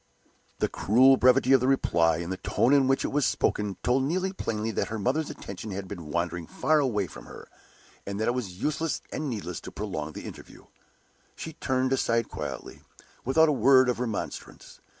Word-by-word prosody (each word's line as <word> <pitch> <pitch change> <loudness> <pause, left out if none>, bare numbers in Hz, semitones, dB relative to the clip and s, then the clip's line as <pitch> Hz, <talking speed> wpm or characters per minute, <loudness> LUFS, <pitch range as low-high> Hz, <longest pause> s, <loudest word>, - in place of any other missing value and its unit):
The - - +1
cruel 130 +6 +5
brevity 130 +1 +4
of 135 - +5
the 130 - +1
reply, 85 -11 +2
and 85 +2 -5
the 95 - -3
tone 125 +7 +1
in 140 -2 +4
which 135 0 +2
it - - -1
was 145 0 0
spoken, 105 -5 0
told 125 +2 +2
Neelie 185 +7 -1
plainly 110 - -3
that - - -1
her 110 - -4
mother's 135 +9 0
attention 100 +2 -8
had 95 -1 -5
been 85 -6 -8
wandering 85 +1 -2
far 155 -1 +2
away 115 -8 0
from - - -12
her, - - -11 0.6
and 100 +1 -5
that 110 - 0
it 120 - +2
was 100 -8 -5
useless 155 +4 -1
and 155 -2 -3
needless 100 -7 -5
to - - -9
prolong 80 -7 -5
the - - -8
interview. - - -11 0.7
She 160 - -7
turned 130 -2 0
aside 115 -3 +1
quietly, - - -6 0.4
without 160 +6 +4
a - - +3
word 130 -2 +5
of 120 - -1
remonstrance. 115 -4 -5
120 Hz, 190 wpm, -27 LUFS, 100-135 Hz, 0.7 s, cruel